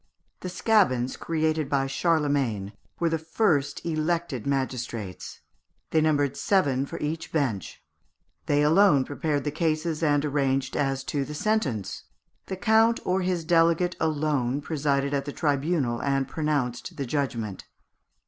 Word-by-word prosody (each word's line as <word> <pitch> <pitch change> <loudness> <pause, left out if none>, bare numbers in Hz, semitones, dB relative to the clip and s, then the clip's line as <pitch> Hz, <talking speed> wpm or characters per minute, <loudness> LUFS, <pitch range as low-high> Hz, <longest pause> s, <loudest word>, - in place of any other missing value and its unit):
The 185 - -5
scabins 175 - +2
created 155 -2 -1
by 135 -2 +1
Charlemagne 135 - 0 0.3
were 170 - +2
the 165 0 -1
first 160 -4 0
elected 160 -5 -1
magistrates. 125 -7 -3 0.5
They 160 - +3
numbered 145 -3 +2
seven 140 -9 +1
for - - -6
each 160 +2 -4
bench. 125 - -2 0.6
They 145 0 +3
alone 155 -3 +5
prepared 145 -1 -2
the 145 - -2
cases 155 0 -1
and 145 -2 +2
arranged 135 -2 0
as 135 -2 0
to 140 0 -2
the 150 +2 -7
sentence. 145 - -1 0.4
The 190 - -4
count 225 +3 +4
or 185 +1 +1
his 180 -3 -1
delegate 170 +1 +3
alone 145 -4 0
presided 140 -2 -1
at 140 -1 0
the 145 - -5
tribunal, 145 -4 0
and 135 -1 0
pronounced 145 -6 -2
the 140 - -2
judgment. 120 -7 -3
145 Hz, 135 wpm, -26 LUFS, 135-165 Hz, 0.6 s, alone